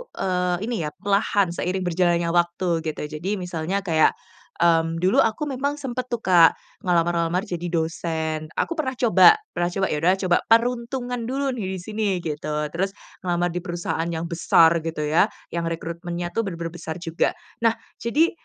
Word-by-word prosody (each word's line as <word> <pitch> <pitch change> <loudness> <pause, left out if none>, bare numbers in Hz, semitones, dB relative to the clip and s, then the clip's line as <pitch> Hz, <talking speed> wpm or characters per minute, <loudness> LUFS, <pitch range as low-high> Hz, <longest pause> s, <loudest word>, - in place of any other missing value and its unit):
eee, 180 -1 0
ini 245 - -1
ya 150 - -2
perlahan 200 -2 +1
seiring 185 +1 -2
berjalannya 170 -1 +2
waktu 175 0 +1
gitu. 155 - -3 0.2
Jadi 195 +6 -1
misalnya 180 +1 -3
kayak, 160 -4 +4 0.4
mmm, 165 0 +2
dulu 185 - +4
aku 225 +7 +2
memang 280 +2 -1
sempet 255 -3 -4
tuh, 240 -2 -4
Kak 175 -3 +6 0.3
ngelamar-lamar 170 +1 +1
jadi 175 -4 -4
dosen, 160 -2 -2
aku - - -1
pernah 265 -4 -1
coba 235 - +6 0.2
pernah 175 0 0
coba, 190 +2 -1
ya 150 - 0
udahlah 180 +4 +4
coba 180 -2 +3
peruntungan 240 +1 +1
dulu 270 +2 -1
nih 190 -2 -3
di 185 - -6
sini, 215 +2 -2 0.2
gitu. 150 -1 -3 0.2
Terus 195 +3 -2 0.2
ngelamar 175 -1 0
di 180 - -2
perusahaan 170 -1 -3
yang 165 0 -3
besar 165 0 +4
gitu 160 -1 -4
ya, 155 +6 +3 0.2
yang 170 -1 -2
rekrutmennya 170 +1 -4
tuh 225 -2 -1
benar-benar 170 -2 -4
besar 160 -1 -6
juga. 165 -2 0 0.2
Nah 230 0 +3 0.2
jadi, 300 +9 +2
175 Hz, 165 wpm, -23 LUFS, 165-210 Hz, 0.4 s, Kak